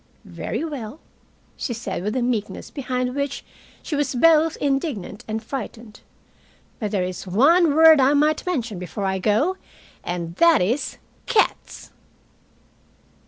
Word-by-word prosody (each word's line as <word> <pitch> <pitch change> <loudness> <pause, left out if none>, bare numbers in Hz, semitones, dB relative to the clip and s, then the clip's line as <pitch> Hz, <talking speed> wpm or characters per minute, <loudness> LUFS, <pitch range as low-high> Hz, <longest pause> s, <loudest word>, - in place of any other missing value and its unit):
"Very - - -4
well," 280 -3 -6 0.6
she 240 - -4
said, 230 -5 -4
with 210 +5 -3
a 255 - 0
meekness 240 -4 -3
behind 255 -3 -2
which 280 0 -3 0.4
she 310 - -3
was 290 -2 -1
both 320 +3 +4
indignant 270 - -2
and 220 +1 -4
frightened. 230 -3 -7 0.8
"But 210 - -2
there 195 -3 0
is 180 +1 -5
one 290 - +4
word 320 -2 +7
I 270 +3 +4
might 300 +1 +2
mention 240 - -3
before 180 +3 -5
I 190 0 -1
go, 225 - +1 0.5
and 170 -1 -5
that 335 -2 +5
is 235 +11 -1 0.3
cats!" 445 -4 0
255 Hz, 135 wpm, -22 LUFS, 210-300 Hz, 0.8 s, word